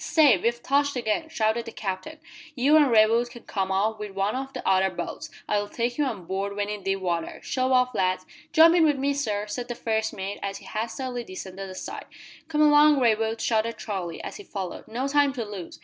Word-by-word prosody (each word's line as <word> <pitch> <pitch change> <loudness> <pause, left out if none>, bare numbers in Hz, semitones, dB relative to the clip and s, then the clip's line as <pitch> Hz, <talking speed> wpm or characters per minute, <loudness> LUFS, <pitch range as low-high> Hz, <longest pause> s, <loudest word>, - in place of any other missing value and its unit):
"Stay! 295 -8 +5
We've 235 +6 -1
touched 285 +1 +2
again!" 245 +6 -1
shouted 230 -5 0
the 230 - -7
Captain. 205 +11 -5 0.4
"You 275 +4 +4
an' 295 -3 +6
Raywood 230 +1 +4
can 240 -1 -12
come 190 -2 -2
off 210 +3 0
with 210 -2 -7
one 195 +3 0
o' 265 +1 -3
the - - -6
other 190 0 +4
boats. - - -6 0.2
I'll 205 0 0
take 240 +3 -2
you 295 - +3
on 215 -9 -4
board 195 +2 -3
when 205 0 -2
in 210 -1 -4
deep 195 0 -1
water 170 -3 -2
shove 260 0 0
off, 250 -1 +3
lads." 185 0 0 0.3
"Jump 325 +1 +7
in 345 -2 +5
with 295 -3 +3
me, 280 +1 +1
sir," 215 -7 -1
said 240 +4 -5
the 240 - -4
first 220 -1 -1
mate, 195 +1 -5
as 195 0 -3
he - - -14
hastily 240 +3 -4
descended 190 -1 -8
the 185 - -8
side. - - -6 0.4
"Come 305 -2 0
along, 295 -1 +6
Raywood," 225 -2 +1
shouted 230 0 0
Charlie, 185 -6 -5
as - - -6
he 410 - -10
followed. 190 - -6
"No 245 +5 -2
time 285 -1 +3
to 240 -4 -4
lose!" 200 -5 -8
225 Hz, 220 wpm, -26 LUFS, 200-265 Hz, 0.4 s, Jump